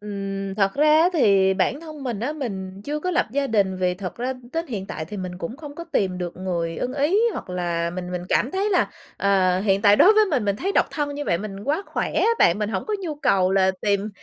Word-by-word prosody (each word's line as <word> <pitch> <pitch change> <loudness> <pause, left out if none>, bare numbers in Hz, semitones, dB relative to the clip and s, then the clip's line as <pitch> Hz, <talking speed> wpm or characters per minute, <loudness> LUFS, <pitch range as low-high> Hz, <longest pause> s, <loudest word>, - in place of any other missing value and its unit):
Ừm, 195 -1 -5
thật 195 -1 +1
ra 300 +2 +3
á 340 - +5
thì 195 - +4
bản 195 +9 0
thân 310 -3 -9
mình 240 -6 -3
á, 260 +6 -1
mình 195 -9 -5
chưa 300 +1 -3
có 365 - -1
lập 360 - +1
gia 280 +1 0
đình 200 -5 +1
vì 180 -1 0
thật 180 -1 -6
ra 250 +2 -2 0.2
đến 330 +1 -2
hiện 205 -8 -5
tại 175 -6 -5
thì 205 +6 -8
mình 185 -2 -5
cũng 185 +8 -5
không 295 -1 -9
có 335 - -7
tìm 190 - -1
được 175 -1 -5
người 170 -3 -3
ưng 255 - -3
ý, 295 +8 +2
hoặc - - -7
là 170 -2 -1
mình 180 0 -6
mình 180 -1 -3
cảm 250 - +1
thấy 390 +4 0
là, 370 - +2 0.3
ờ, 190 -2 +2
hiện 195 -1 +1
tại 205 -1 +6
đối 400 - +7
với 430 0 +5
mình, 265 -8 +1
mình 200 -1 0
thấy 390 - -2
độc - - +3
thân 290 -2 -2
như 290 0 -4
vậy 170 - +1
mình 200 0 -7
quá 300 +8 0
khỏe - - -3
ấy - - +3
bạn, 170 +3 +4
mình 210 -1 -1
hổng 195 -4 -3
có 430 - -1
nhu 335 -5 -4
cầu 190 -10 +2
là 190 -1 +4
tìm 200 0 0
205 Hz, 260 wpm, -23 LUFS, 190-290 Hz, 0.3 s, đối